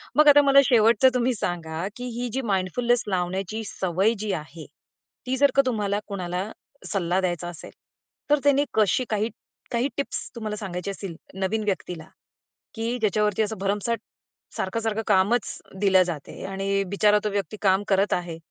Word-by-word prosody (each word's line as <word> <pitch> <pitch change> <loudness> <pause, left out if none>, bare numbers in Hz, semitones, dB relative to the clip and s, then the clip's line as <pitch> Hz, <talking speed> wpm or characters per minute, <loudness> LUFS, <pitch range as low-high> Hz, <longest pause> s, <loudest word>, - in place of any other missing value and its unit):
मग 300 0 +6
आता 290 0 +9
मला 275 -1 +6
शेवटचं 235 +1 +5
तुम्ही 250 0 +1
सांगा, 170 -2 -3
की 245 - -6
ही 245 - -1
जी 265 - 0
माइंडफुलनेस 230 +3 +1
लावण्याची 190 +3 -2
सवय 190 +5 +1
जी 210 0 -2
आहे, 155 +1 -7 0.6
ती 260 +1 0
जर 285 0 +5
का 275 - +7
तुम्हाला 210 -4 0
कुणाला 185 0 -3 0.4
सल्ला 185 -2 +1
द्यायचा 175 -2 -2
असेल, 175 - -10 0.6
तर 295 0 +4
त्यांनी 285 0 +4
कशी 215 +4 +2
काही 215 +1 0 0.4
काही 240 +3 +1
टिप्स 280 - -3
तुम्हाला 215 -2 -4
सांगायची 190 -1 -4
असतील 195 -3 -7 0.2
नवीन 210 +3 0
व्यक्तीला, 180 -5 -3 0.7
की 230 +2 -2
ज्याच्यावरती 210 -1 +1
असं 215 +1 -3
भरमसाट 205 +4 -1 0.6
सारखं-सारखं 220 +2 -1
असं - - -15
कामच 200 +4 +2 0.2
दिलं 190 -2 +5
जाते 165 -5 -6
आणि 195 +1 -1
बिचारा 210 +1 +4
तो 210 - 0
व्यक्ती 200 +1 -3
काम 195 0 +3
करत 195 +1 +2
आहे. 175 -2 -3
205 Hz, 160 wpm, -25 LUFS, 185-230 Hz, 0.7 s, आता